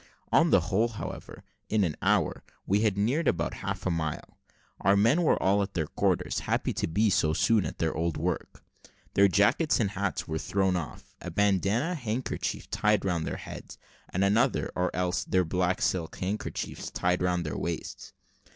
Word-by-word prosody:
On - - +5
the - - +5
whole, 110 +5 +1
however, 115 -3 -8 0.3
in 105 -1 +2
an 80 -5 -1
hour - - +1 0.2
we 100 +2 +2
had 105 -3 +1
neared 130 +10 +1
about 85 -1 0
half 100 -1 -5
a 95 - +1
mile. 80 -2 -4 0.4
Our 100 +2 +4
men 115 +12 +4
were 165 - +3
all 100 +2 +3
at 100 0 -4
their 80 -3 0
quarters, - - 0
happy - - -1
to - - -1
be 105 +6 +2
so 80 -4 +2
soon 110 +3 +2
at - - -7
their 80 -1 0
old 85 0 -1
work. 90 +1 -3 0.5
Their 100 0 +6
jackets 105 - +3
and 105 -4 +1
hats 100 -1 -2
were 80 -1 -2
thrown 95 0 +1
off, 85 -4 -6
a - - -5
bandana 100 - +1
handkerchief 125 -5 -3
tied 105 -2 +2
round 85 -4 -1
their - - -3
heads, - - -9 0.3
and 95 - 0
another, 115 +7 +2
or 90 0 +1
else 90 0 0
their 90 -1 +1
black 90 +2 0
silk 85 -3 -1
handkerchiefs, 100 +3 -4
tied 90 0 0
round 90 -1 0
their 75 - -3
waists. 85 -1 -5
95 Hz, 180 wpm, -28 LUFS, 90-105 Hz, 0.5 s, Their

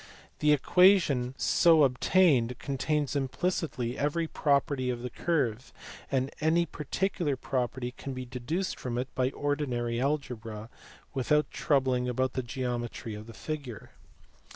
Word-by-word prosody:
The 150 0 +4
equa 185 +7 +6
tion 130 -6 -2
so 165 -3 +5
obtained 130 -2 +3
contains 145 +1 -1
implicitly 135 -3 -2
every 150 +4 0
property 140 -4 +1
of 120 -1 -3
the 125 - -4
curve, 130 -8 -1 0.4
and 135 0 0
any 165 +2 +3
particular 165 0 -2
property 125 -1 -2
can 135 -1 -6
be 130 0 -5
deduced 135 +10 -3
from 120 -2 -3
it 130 +1 -3
by 130 0 +1
ordinary 125 -5 -1
algebra 120 -6 -3 0.4
without 150 +3 +1
troubling 130 -4 +1
about 130 +1 0
the 130 - -1
geometry 120 -2 -4
of 105 +1 -8
the 115 - -11
figure. 130 +2 -6
130 Hz, 130 wpm, -29 LUFS, 125-150 Hz, 0.4 s, equa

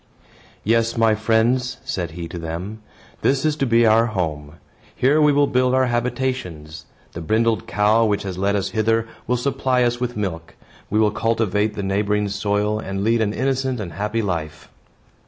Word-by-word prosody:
"Yes, 115 +1 +1
my 115 -1 +4
friends," 115 +4 +1
said 90 -3 -3
he 85 -1 -5
to 85 - -6
them, 85 +7 -6 0.4
"this 135 +2 +1
is 155 -1 +2
to 135 - 0
be 115 0 +4
our 115 +1 +4
home. 80 -8 -3 0.4
Here 145 +4 +3
we 150 -1 +5
will 145 0 +4
build 125 -1 +1
our 130 0 +3
habitations. 120 - -3 0.2
The 85 - -7
brindled 110 +6 +1
cow, 105 +2 +3
which 105 -2 0
has 95 -2 -4
led 100 +2 0
us 100 - -1
hither, 115 0 +1 0.2
will 125 +1 +1
supply 130 -1 0
us 120 0 0
with 120 -2 -3
milk. 85 -5 -4 0.3
We 105 - +1
will 105 -1 +3
cultivate 110 -1 0
the 100 - -4
neighboring 105 +1 0
soil 105 +1 0
and 95 -2 -4
lead 115 +1 +2
an 105 -2 +1
innocent 130 +1 -1
and 90 -6 -6
happy 105 +6 -2
life." 80 -5 -4
110 Hz, 175 wpm, -21 LUFS, 100-120 Hz, 0.4 s, we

